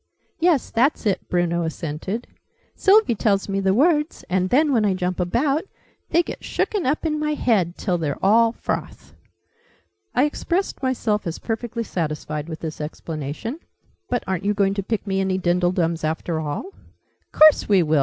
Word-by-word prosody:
"Yes, 330 -5 +2
that's 250 +3 +1
it," 200 -3 -1
Bruno 175 -1 +1
assented. 165 +6 -4 0.5
"Sylvie 410 - +4
tells 200 -2 +1
me 195 -1 -1
the 190 -1 +2
words, 300 +3 +2
and 185 0 +1
then, 290 +4 +3
when 225 -4 +3
I 200 -3 +2
jump 180 0 -2
about, 275 - +1 0.5
they 340 +2 +3
get - - -7
shooken 400 -9 -1
up 300 +5 0
in 305 -1 0
my 300 0 0
head 195 - +1
till 180 -4 -1
they're 145 -4 -2
all 225 +3 +5
froth!" - - -5 1.0
I 250 - +4
expressed 340 +5 -1
myself 230 -7 0
as 165 - -3
perfectly 230 0 -3
satisfied 155 -4 -3
with 160 - -7
this 155 -2 -5
explanation. 155 - -5 0.5
"But 245 -1 0
aren't 190 -2 -2
you 205 +1 +1
going 195 -1 +2
to 200 - -2
pick 215 +2 -3
me 195 -1 0
any 190 -1 0
dindledums, 175 -2 +1
after 160 +1 -1
all?" 155 - -4 0.6
"Course 310 -6 +6
we 195 -4 +5
will!" 155 -1 +2
195 Hz, 165 wpm, -22 LUFS, 170-260 Hz, 1.0 s, Course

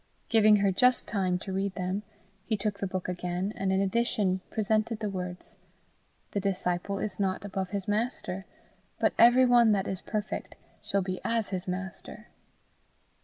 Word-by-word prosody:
Giving 215 -2 +6
her 200 -1 +3
just 250 +6 +3
time 185 -4 0
to 190 +1 -6
read 195 0 -1
them, 185 +2 -2 0.4
he 220 0 -1
took 200 0 -2
the 195 - -1
book 185 -1 -4
again, 180 +2 -2
and 190 0 -1
in 190 - +2
addition 195 -2 +1
presented 215 +1 0
the 210 -2 -3
words, 180 -1 -6 0.7
"The 200 - -1
disciple 190 0 -1
is 205 0 -3
not 190 0 -1
above 190 -2 -3
his 200 -1 -3
master, 205 -3 -2 0.5
but - - +2
every 245 +2 +7
one 240 -3 +6
that 195 -1 0
is 190 -1 -3
perfect 210 -1 -4 0.3
shall 200 -1 0
be 185 0 -4
as 230 -2 0
his 185 -1 -4
master." 185 0 -6
195 Hz, 165 wpm, -29 LUFS, 185-215 Hz, 0.7 s, every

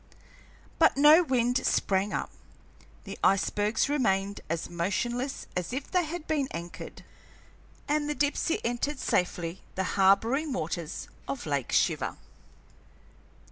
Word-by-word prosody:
But 320 -4 +5
no 300 +4 +8
wind 250 -5 +1
sprang 195 +1 +1
up; - - -3 0.7
the - - -8
icebergs 205 +2 +2
remained 200 -8 0
as 165 0 -2
motionless 240 +10 -2
as 180 +5 -3
if 270 +2 -4
they 360 -2 +2
had 320 0 -6
been 290 -4 0
anchored, 170 +1 -8 0.8
and 295 0 0
the 295 - -1
Dipsey 290 +3 0
entered 245 +5 -1
safely 175 -5 -1
the 190 - 0
harboring 225 +10 +3
waters 170 -5 -4 0.2
of 275 - -4
Lake 140 -4 -2
Shiver. - - +1
240 Hz, 120 wpm, -28 LUFS, 190-290 Hz, 0.8 s, no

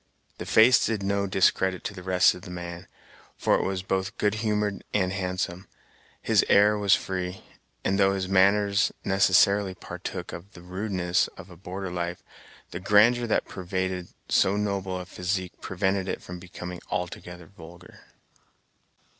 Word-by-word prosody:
The - - -6
face 120 +3 +6
did 110 -3 -1
no 100 0 0
discredit 95 0 +2
to - - -4
the 95 - -9
rest 90 0 +4
of 90 - -11
the 90 - -10
man, 85 0 -7 0.5
for - - +1
it - - +3
was 95 -1 -2
both 95 +1 -2
good 105 -1 +1
humored 105 -2 -1
and 95 -2 +1
handsome. 90 -1 -3 0.6
His - - +4
air 105 +1 +5
was 100 -1 +4
free, 90 0 -4 0.4
and 100 +1 +1
though 95 0 +4
his 95 -1 -2
manner 100 +2 +3 0.3
necessarily 95 0 +3
partook - - -7
of 90 +4 -10
the 85 - -13
rudeness 90 -1 -1
of 95 0 -11
a - - -11
border 95 +2 -6
life, 85 0 -4 0.5
the 85 - -5
grandeur 110 +5 +4
that 110 - +1
pervaded 95 -1 -3 0.2
so 95 +2 +3
noble 100 -3 -2
a 90 - -7
physique 90 0 -4
prevented 95 0 -1
it - - -4
from 90 0 -8
becoming 90 0 -8
altogether 90 -2 -5
vulgar. 85 -1 -14
95 Hz, 155 wpm, -26 LUFS, 90-100 Hz, 0.6 s, face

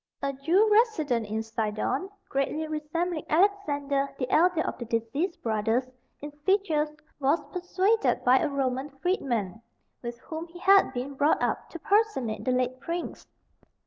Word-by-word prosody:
A 275 0 0
Jew 330 +11 +3
resident 310 - +2
in 220 +1 -2
Sidon, 220 - -2 0.2
greatly 290 +3 -1
resembling 310 +2 -2
Alexander, 290 -7 +1
the 255 - -2
elder 350 0 +4
of - - -2
the 240 - -4
deceased 230 - -2
brothers, 225 +3 0 0.3
in 295 +1 -6
features, 330 -6 +2 0.3
was 285 +4 +3
persuaded 375 +4 +1
by 255 +1 +6
a 310 - 0
Roman 270 0 -1
freedman, 250 - -2 0.4
with 240 -1 -6
whom 320 +1 -6
he 345 +1 -13
had 390 -3 +5
been 260 +2 -4
brought 290 +3 +2
up, - - -1
to - - -7
personate 395 - +1
the 255 - +2
late 255 0 0
prince. 335 +4 -5
290 Hz, 145 wpm, -27 LUFS, 250-350 Hz, 0.4 s, by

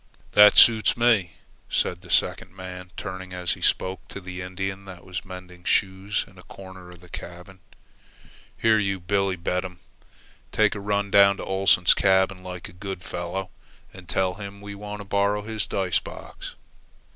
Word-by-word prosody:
"That 105 0 +8
suits 110 -2 +6
me," 115 -7 +3 0.4
said 90 0 0
the 90 - -14
second - - +1
man, 90 -1 -8
turning, 95 -1 -6
as 90 -1 -1
he - - -10
spoke, 95 +1 0
to - - -8
the 90 -1 -7
Indian 95 +1 -5
that 95 -2 -11
was 90 0 -5
mending 90 -1 -10
snow - - -9
shoes 95 +1 0
in 95 -1 -17
a - - -11
corner 95 -1 -12
of 90 -1 -14
the 90 - -15
cabin. 90 +3 -10 1.0
"Here, 110 -1 +4
you 100 -2 -1
Billebedam, 90 -1 -1 0.7
take 110 -1 +3
a 105 - -5
run 100 0 -1
down 100 0 +6
to - - -6
Oleson's 95 -2 +4
cabin 95 -1 +2
like 90 -1 -7
a - - -13
good 95 0 -7
fellow, 90 +2 -4 0.4
and - - -13
tell 95 -1 +1
him 100 0 -8
we 100 0 -8
want 105 +1 -7
to - - -9
borrow 100 +1 +1
his 110 -1 -2
dice 95 -3 0
box." - - -10
95 Hz, 170 wpm, -25 LUFS, 90-100 Hz, 1.0 s, That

